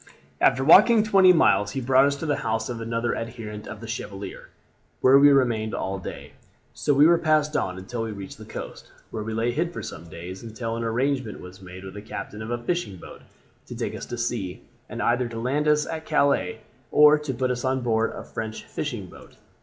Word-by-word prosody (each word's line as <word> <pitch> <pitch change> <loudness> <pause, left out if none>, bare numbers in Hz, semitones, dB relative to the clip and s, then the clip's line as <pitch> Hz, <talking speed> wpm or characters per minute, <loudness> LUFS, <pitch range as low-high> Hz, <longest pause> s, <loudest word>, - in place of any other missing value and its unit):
"After 130 - +4
walking 210 - +7
twenty 195 -3 +6
miles 105 - +3
he 135 - -2
brought 130 +1 +4
us 140 - 0
to 140 - -6
the 145 -2 0
house 110 +1 -2
of 120 -2 -5
another 115 +1 -1
adherent 110 -2 -6
of - - -8
the 115 - -8
Chevalier, 100 -4 -7 0.5
where 135 +2 +6
we 145 +1 +8
remained 120 -5 +2
all 95 0 -3
day. 95 - -8 0.4
So - - 0
we 145 +1 +6
were 170 +1 +5
passed 155 -1 +2
on 90 0 -1
until 115 +5 -5
we 115 -1 -3
reached 100 -2 -9
the - - -10
coast, - - -8 0.2
where 110 - -4
we 110 +1 -4
lay 115 +2 +1
hid 170 +7 -1
for - - -7
some 80 +1 -8
days 90 +4 -8
until 115 0 -5
an 115 - -3
arrangement 125 0 -1
was 90 +2 -12
made 90 0 -10
with 95 -1 -8
the 105 - -8
captain 105 0 -7
of 110 - -6
a 120 - -1
fishing 120 - -3
boat - - -12 0.5
to - - -8
take - - -3
us - - -7
to 120 - -5
sea, 120 -6 -3 0.3
and - - -4
either 120 +1 +1
to 115 -1 -6
land 140 +6 0
us 150 0 +3
at 160 -1 -6
Calais 140 -9 +1 0.3
or 150 0 +7
to 150 -2 -4
put 130 0 -1
us 125 -1 -3
on 130 0 0
board 115 -2 +1
a - - -7
French 110 0 -6
fishing 120 -10 -5
boat. 90 - -15
120 Hz, 220 wpm, -25 LUFS, 110-140 Hz, 0.5 s, we